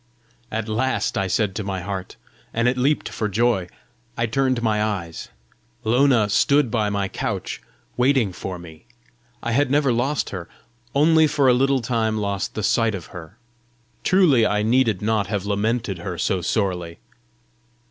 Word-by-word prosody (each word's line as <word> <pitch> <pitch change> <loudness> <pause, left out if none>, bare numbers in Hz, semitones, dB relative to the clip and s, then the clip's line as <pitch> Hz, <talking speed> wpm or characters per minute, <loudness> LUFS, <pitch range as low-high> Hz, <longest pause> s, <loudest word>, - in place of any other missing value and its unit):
"At 110 0 -3
last!" 130 +5 -1
I 95 - 0
said 100 +1 0
to 105 - -4
my 95 -2 -3
heart, 95 0 -5 0.4
and 115 +2 +2
it 125 - +2
leaped 135 +4 +1
for 105 - -3
joy. 110 -3 +1 0.5
I 115 - +1
turned 130 +1 0
my 105 -2 +1
eyes; 95 -6 -4 0.5
Lona 120 -1 +3
stood 140 +4 +3
by 110 -3 +1
my 100 -1 -1
couch, - - -4 0.4
waiting 125 -6 +2
for 90 0 -6
me! 80 -2 -13 0.6
I 120 - -1
had 140 +3 +2
never 140 -2 +2
lost 120 +1 -1
her! 90 -3 -6 0.5
only 160 +2 +5
for 145 -2 +2
a 125 - +6
little 135 +1 +2
time 115 -2 0
lost 100 -2 -2
the 110 - -3
sight 110 +1 +2
of 90 - -7
her! 90 +4 -10 0.7
Truly 170 -11 +4
I 105 -1 +1
needed 115 -4 +2
not 105 -2 +1
have 100 -1 -2
lamented 105 -1 -1
her 90 0 -5
so 95 +1 0
sorely! 90 -4 -1
110 Hz, 160 wpm, -22 LUFS, 100-125 Hz, 0.7 s, a